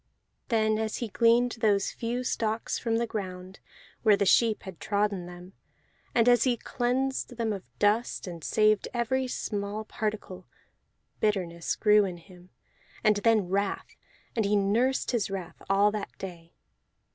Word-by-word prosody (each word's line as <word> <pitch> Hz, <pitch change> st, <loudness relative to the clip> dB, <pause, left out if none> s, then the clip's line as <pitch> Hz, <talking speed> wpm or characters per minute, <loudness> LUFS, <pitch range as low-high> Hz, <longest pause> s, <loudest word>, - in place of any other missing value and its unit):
Then 220 Hz, -2 st, +2 dB
as 220 Hz, -1 st, -2 dB
he 235 Hz, -, -4 dB
gleaned 235 Hz, +3 st, +3 dB
those 205 Hz, -3 st, +2 dB
few 240 Hz, +2 st, -3 dB
stalks 225 Hz, -2 st, -1 dB
from 225 Hz, -2 st, 0 dB
the 235 Hz, -, +1 dB
ground, 185 Hz, -3 st, -6 dB, 0.4 s
where 215 Hz, -3 st, +5 dB
the 200 Hz, -, +1 dB
sheep 220 Hz, +2 st, +3 dB
had 190 Hz, -4 st, -9 dB
trodden 200 Hz, -3 st, -1 dB
them, 180 Hz, +1 st, -11 dB, 0.6 s
and 235 Hz, -1 st, +4 dB
as 245 Hz, -2 st, +6 dB
he 245 Hz, -2 st, +2 dB
cleansed 255 Hz, +1 st, -2 dB
them 225 Hz, -2 st, 0 dB
of 195 Hz, -, -5 dB, 0.2 s
dust 210 Hz, +3 st, +1 dB
and 170 Hz, -4 st, -8 dB
saved 215 Hz, +2 st, +2 dB
every 255 Hz, +2 st, 0 dB
small 210 Hz, -2 st, -3 dB
particle: 210 Hz, -5 st, -4 dB, 0.7 s
bitterness 180 Hz, -6 st, -1 dB
grew 210 Hz, -1 st, +5 dB
in 180 Hz, -2 st, -5 dB
him, 180 Hz, +1 st, -17 dB, 0.5 s
and 215 Hz, -2 st, +4 dB
then 215 Hz, -2 st, +3 dB
wrath, 200 Hz, +1 st, -2 dB, 0.4 s
and 225 Hz, -, +2 dB
he 205 Hz, +1 st, +2 dB
nursed 225 Hz, +7 st, +1 dB
his 235 Hz, -6 st, 0 dB
wrath 190 Hz, -3 st, -6 dB
all 200 Hz, +1 st, +4 dB
that 210 Hz, -1 st, -6 dB
day. 170 Hz, -3 st, -9 dB
210 Hz, 150 wpm, -28 LUFS, 195-230 Hz, 0.7 s, as